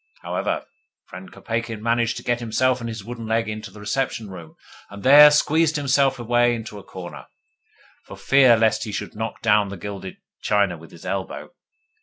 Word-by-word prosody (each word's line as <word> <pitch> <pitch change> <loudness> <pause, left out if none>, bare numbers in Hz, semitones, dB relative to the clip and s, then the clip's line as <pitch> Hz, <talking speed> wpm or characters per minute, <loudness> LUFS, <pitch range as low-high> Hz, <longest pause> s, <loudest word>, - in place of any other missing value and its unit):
However, - - -2 0.4
friend 95 +1 -11
Kopeikin 115 -1 -4
managed 115 +1 0
to - - -8
get 120 0 0
himself 125 +2 0
and 115 -1 -5
his 110 -2 -7
wooden 115 0 -7
leg 115 0 0
into 110 0 -6
the 105 - -14
reception 110 0 -3
room, 85 -4 -11 0.3
and 100 0 -11
there 145 +3 +9
squeezed 155 +2 +2
himself 140 -2 +2
away 120 0 +2
into 110 -2 -8
a - - -13
corner, 90 -2 -10 0.8
for - - -10
fear 130 -4 +5
lest 110 0 +2
he 110 - -6
should - - -5
knock 110 +1 -5
down 105 -3 +3
the 100 - -7
gilded 95 +1 -7 0.2
china 100 -4 +1
with 80 0 -14
his 85 - -15
elbow. 95 0 -5
115 Hz, 180 wpm, -22 LUFS, 100-120 Hz, 0.8 s, there